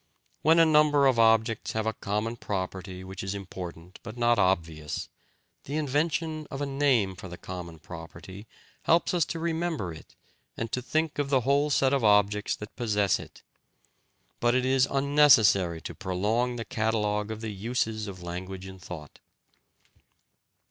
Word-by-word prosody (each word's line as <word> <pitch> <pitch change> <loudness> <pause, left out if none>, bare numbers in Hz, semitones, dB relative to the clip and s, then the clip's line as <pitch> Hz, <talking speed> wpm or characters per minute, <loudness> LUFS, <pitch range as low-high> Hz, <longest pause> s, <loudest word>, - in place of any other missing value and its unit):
When 160 +2 +5
a 165 - +7
number 150 -2 +4
of 130 -3 +3
objects 115 0 +3
have 110 -1 -1
a 110 - 0
common 105 +3 -2
property 95 -3 -5
which 95 0 -7
is 95 +1 -3
important 90 -2 -8
but 110 +2 -9
not 120 -1 +3
obvious, 80 -5 -1 0.6
the 140 - -4
invention 155 +1 -1
of 135 - -6
a 145 - -1
name 135 -9 +1
for 95 - -9
the 90 -1 -9
common 90 -2 -7
property 85 +5 -10 0.4
helps 170 +2 +3
us 170 -3 +2
to 165 - -5
remember 165 - -2
it 80 - -14 0.4
and 115 -1 -4
to 125 - -1
think 155 +4 -1
of 145 -1 0
the 135 -2 +3
whole 140 +4 +2
set 135 -1 +3
of 135 -3 +1
objects 105 0 +3
that 105 - -10
possess 105 -4 +1
it. - - -12 1.0
But 120 +1 +2
it 130 0 +2
is 130 0 +3
unnecessary 130 - +4
to - - -6
prolong 110 +7 -1
the 115 -1 -5
catalogue 105 -2 0
of 110 0 -5
the 110 -2 -4
uses 110 +1 -2
of 90 -3 -8
language 90 +2 -6
in 95 0 -10
thought. 80 -5 -10
110 Hz, 160 wpm, -28 LUFS, 95-135 Hz, 1.0 s, a